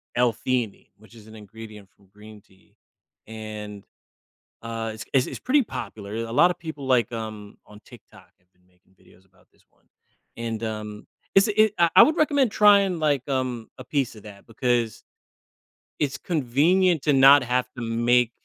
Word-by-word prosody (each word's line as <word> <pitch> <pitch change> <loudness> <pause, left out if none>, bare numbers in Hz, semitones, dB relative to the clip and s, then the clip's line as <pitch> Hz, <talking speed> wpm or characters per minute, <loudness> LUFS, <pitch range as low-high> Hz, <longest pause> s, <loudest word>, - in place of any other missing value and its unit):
L-Theanine, 120 -2 -1
which 110 +2 -19
is 110 -2 -15
an 110 - -13
ingredient 105 -1 -12
from 100 -1 -27
green 105 0 -14
tea, 95 -1 -28 0.5
and, 105 -2 -9 0.8
uh, 115 -1 -4
it's 110 0 -9
it's 130 -2 +2
it's - - -7
pretty 280 +3 +2
popular 110 - -8
a 115 0 -4
lotta 175 +9 +3
people, 155 -5 -8
like, 120 -4 +2
um, 110 -3 -8
on 105 0 -15
TikTok 120 -4 -17
have 90 0 -41
been 90 0 -36
making 90 +1 -34
videos 95 0 -24
about 95 -1 -30
this - - -32
one, - - -38 0.5
and, 115 -1 -5
um, 105 -1 -6 0.3
it's 195 +3 +5
a 215 0 +3
I 170 - +5
I - - +11
would 315 - +2
recommend 285 -6 +2
trying, 200 -4 +4
like, 145 -4 0
um, 130 -4 -3
a - - -8
piece 135 -6 -2
of 105 - -14
that 100 -2 -13
because 120 -1 -1 1.0
it's 140 -1 -1
convenient 165 +4 +1
to 150 - +2
not 135 +1 +7
have 125 0 -1
to - - -6
make 120 +1 +1
115 Hz, 170 wpm, -24 LUFS, 110-140 Hz, 1.0 s, I